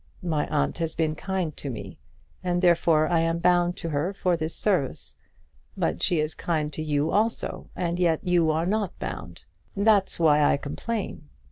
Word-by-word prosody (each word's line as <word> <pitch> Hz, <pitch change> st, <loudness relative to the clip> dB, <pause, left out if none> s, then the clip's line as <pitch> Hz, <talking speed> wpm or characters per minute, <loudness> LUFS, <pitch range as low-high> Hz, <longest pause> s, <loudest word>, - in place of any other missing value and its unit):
My 155 Hz, -4 st, 0 dB
aunt 70 Hz, -, 0 dB
has 165 Hz, -1 st, -1 dB
been 160 Hz, -2 st, +1 dB
kind 185 Hz, -2 st, -3 dB
to 140 Hz, -, -5 dB
me, 100 Hz, -6 st, -7 dB, 0.4 s
and 175 Hz, 0 st, 0 dB
therefore 165 Hz, -3 st, +4 dB
I 170 Hz, 0 st, +2 dB
am 165 Hz, 0 st, +1 dB
bound 175 Hz, 0 st, +2 dB
to 165 Hz, -, -4 dB
her 155 Hz, +6 st, -1 dB
for 180 Hz, -2 st, +1 dB
this 160 Hz, 0 st, -2 dB
service. 180 Hz, -11 st, 0 dB, 0.6 s
But -, -, -1 dB
she 175 Hz, -, +2 dB
is 155 Hz, +1 st, -1 dB
kind 155 Hz, -3 st, -2 dB
to -, -, -3 dB
you 150 Hz, 0 st, 0 dB
also, 225 Hz, +3 st, -1 dB
and 175 Hz, -1 st, -2 dB
yet 165 Hz, -3 st, +2 dB
you 175 Hz, -3 st, +3 dB
are 160 Hz, +2 st, +1 dB
not 205 Hz, 0 st, -1 dB
bound. 85 Hz, -4 st, -7 dB, 0.3 s
That's 200 Hz, -3 st, +3 dB
why 150 Hz, -2 st, +5 dB
I 145 Hz, -, +4 dB
complain. 155 Hz, +1 st, -5 dB
165 Hz, 175 wpm, -26 LUFS, 155-180 Hz, 0.6 s, why